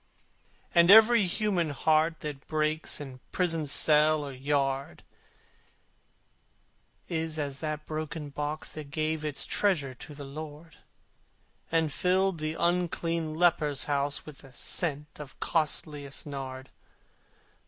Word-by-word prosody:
And 170 Hz, 0 st, +6 dB
every 220 Hz, 0 st, +8 dB
human 190 Hz, -4 st, 0 dB
heart 155 Hz, +3 st, +2 dB
that 145 Hz, -2 st, -6 dB
breaks, 155 Hz, 0 st, 0 dB
In 135 Hz, -3 st, -8 dB
prison 165 Hz, -4 st, +1 dB
cell 150 Hz, +1 st, +4 dB
or 140 Hz, -, -6 dB
yard, 135 Hz, 0 st, -1 dB, 2.0 s
Is 160 Hz, -2 st, -2 dB
as 140 Hz, -3 st, -3 dB
that 155 Hz, -1 st, -4 dB
broken 155 Hz, -1 st, -4 dB
box 150 Hz, +2 st, -4 dB
that 150 Hz, -2 st, -8 dB
gave 155 Hz, +2 st, -1 dB
Its 150 Hz, -2 st, -2 dB
treasure 155 Hz, -10 st, +1 dB
to 145 Hz, +4 st, -10 dB
the 145 Hz, -, -8 dB
Lord, 155 Hz, +3 st, -9 dB, 0.9 s
And 160 Hz, -3 st, +1 dB
filled 185 Hz, -1 st, +1 dB
the 155 Hz, +1 st, -2 dB
unclean 170 Hz, -2 st, 0 dB
leper's 155 Hz, -5 st, +2 dB
house 145 Hz, 0 st, -1 dB
With 150 Hz, -3 st, -10 dB
the 135 Hz, -, -13 dB
scent 150 Hz, +1 st, -3 dB
of 145 Hz, -3 st, -10 dB
costliest 150 Hz, -3 st, -2 dB
nard. 135 Hz, -2 st, -6 dB
155 Hz, 120 wpm, -29 LUFS, 145-165 Hz, 2.0 s, every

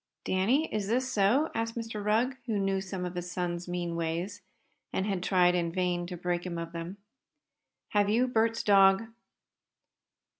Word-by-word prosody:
"Danny, 230 Hz, +12 st, +2 dB
is 210 Hz, -2 st, -1 dB
this 255 Hz, +3 st, 0 dB
so?" 235 Hz, +10 st, +3 dB
asked 230 Hz, 0 st, -2 dB
Mr. 225 Hz, -3 st, -4 dB
Rugg, 225 Hz, +5 st, +2 dB
who 220 Hz, -3 st, 0 dB
knew 195 Hz, -1 st, 0 dB
some 190 Hz, -1 st, -4 dB
of 180 Hz, -, -4 dB
his 180 Hz, 0 st, -5 dB
son's 175 Hz, -1 st, -3 dB
mean 175 Hz, -1 st, -3 dB
ways, 170 Hz, +5 st, -3 dB, 0.5 s
and 190 Hz, -, -1 dB
had 195 Hz, -3 st, -1 dB
tried 180 Hz, -1 st, +4 dB
in 170 Hz, -2 st, 0 dB
vain 175 Hz, -1 st, -1 dB
to 180 Hz, 0 st, -6 dB
break 175 Hz, 0 st, -2 dB
him 175 Hz, -2 st, -4 dB
of 165 Hz, 0 st, -5 dB
them. 170 Hz, +3 st, -6 dB, 0.9 s
"Have 205 Hz, -1 st, +2 dB
you 240 Hz, +4 st, +3 dB
Bert's 225 Hz, -1 st, +1 dB
dog?" 195 Hz, 0 st, +6 dB
195 Hz, 165 wpm, -29 LUFS, 175-220 Hz, 0.9 s, dog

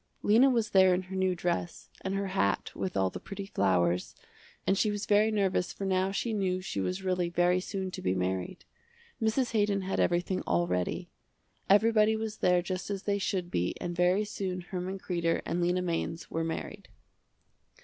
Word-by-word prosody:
Lena 230 Hz, +6 st, +6 dB
was 230 Hz, -4 st, +1 dB
there 190 Hz, -1 st, +6 dB
in 185 Hz, -, -2 dB
her 190 Hz, +1 st, -8 dB
new 190 Hz, -1 st, +1 dB
dress, 175 Hz, 0 st, -3 dB
and 190 Hz, +1 st, -2 dB
her 195 Hz, 0 st, -2 dB
hat 185 Hz, -, 0 dB
with 95 Hz, 0 st, -3 dB
all 95 Hz, -1 st, +2 dB
the -, -, -6 dB
pretty 195 Hz, 0 st, -7 dB
flowers, 90 Hz, -, +1 dB, 0.5 s
and 195 Hz, -, +3 dB
she 210 Hz, +2 st, +2 dB
was 205 Hz, 0 st, -3 dB
very 210 Hz, +1 st, +4 dB
nervous 195 Hz, -4 st, +1 dB
for 195 Hz, -, -5 dB
now 190 Hz, 0 st, +1 dB
she 225 Hz, +3 st, -2 dB
knew 185 Hz, -3 st, 0 dB
she 185 Hz, -, -3 dB
was 185 Hz, -, -2 dB
really 180 Hz, -2 st, 0 dB
very 175 Hz, +1 st, +2 dB
soon 190 Hz, 0 st, -4 dB
to -, -, -6 dB
be 90 Hz, +1 st, 0 dB
married. 95 Hz, -, -3 dB, 0.6 s
Mrs. 230 Hz, +3 st, +1 dB
Haydon 205 Hz, -3 st, +1 dB
had 190 Hz, 0 st, -2 dB
everything 175 Hz, +2 st, +1 dB
all 85 Hz, 0 st, +2 dB
ready. 90 Hz, 0 st, -2 dB, 0.6 s
Everybody 215 Hz, +1 st, +5 dB
was 220 Hz, -1 st, -4 dB
there 180 Hz, -1 st, +3 dB
just 185 Hz, +2 st, -4 dB
as 200 Hz, -1 st, -3 dB
they 200 Hz, -1 st, 0 dB
should 185 Hz, -2 st, -2 dB
be 90 Hz, +1 st, 0 dB
and 175 Hz, -1 st, -4 dB
very 180 Hz, +4 st, +3 dB
soon 190 Hz, -3 st, -4 dB
Herman 185 Hz, +2 st, -4 dB
Kreder 170 Hz, -3 st, -1 dB
and 175 Hz, +2 st, -1 dB
Lena 180 Hz, +1 st, +1 dB
Mainz 165 Hz, -1 st, -3 dB
were 165 Hz, -, -1 dB
married. 180 Hz, +5 st, -5 dB
185 Hz, 190 wpm, -30 LUFS, 175-200 Hz, 0.6 s, Lena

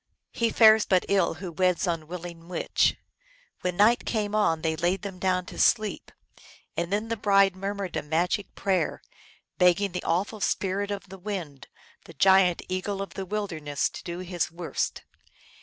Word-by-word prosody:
He 230 Hz, -1 st, 0 dB
fares 220 Hz, -1 st, +6 dB
but 185 Hz, -2 st, +3 dB
ill 195 Hz, -4 st, +2 dB
who 175 Hz, +2 st, -7 dB
weds 180 Hz, +3 st, +1 dB
unwilling 170 Hz, 0 st, -5 dB
witch. 180 Hz, -1 st, +1 dB, 0.6 s
When 180 Hz, -1 st, -3 dB
night 220 Hz, +4 st, +4 dB
came 210 Hz, -2 st, -2 dB
on 165 Hz, -7 st, +1 dB
they 160 Hz, -1 st, +1 dB
laid 175 Hz, +5 st, 0 dB
them 195 Hz, -3 st, -6 dB
down 185 Hz, -1 st, 0 dB
to -, -, -9 dB
sleep, 215 Hz, -3 st, +1 dB, 0.6 s
and 170 Hz, +1 st, -2 dB
then 210 Hz, +3 st, -1 dB
the 230 Hz, -, 0 dB
bride 195 Hz, -3 st, +3 dB
murmured 195 Hz, -1 st, -4 dB
a -, -, 0 dB
magic 175 Hz, +6 st, -1 dB
prayer, 185 Hz, -5 st, -1 dB, 0.6 s
begging 180 Hz, +2 st, +4 dB
the 180 Hz, -, -4 dB
awful 195 Hz, +6 st, -1 dB
Spirit 200 Hz, +2 st, -1 dB
of 200 Hz, -2 st, -5 dB
the 190 Hz, 0 st, -10 dB
Wind, 175 Hz, -, -6 dB, 0.4 s
the 165 Hz, -, -13 dB
giant 190 Hz, +1 st, +4 dB
Eagle 185 Hz, +2 st, -3 dB
of 195 Hz, -, -5 dB
the 190 Hz, -1 st, -5 dB
wilderness, 165 Hz, -9 st, -2 dB
to -, -, -9 dB
do 170 Hz, 0 st, -5 dB
his 175 Hz, -1 st, -1 dB
worst. 170 Hz, 0 st, -3 dB
185 Hz, 165 wpm, -26 LUFS, 175-200 Hz, 0.6 s, fares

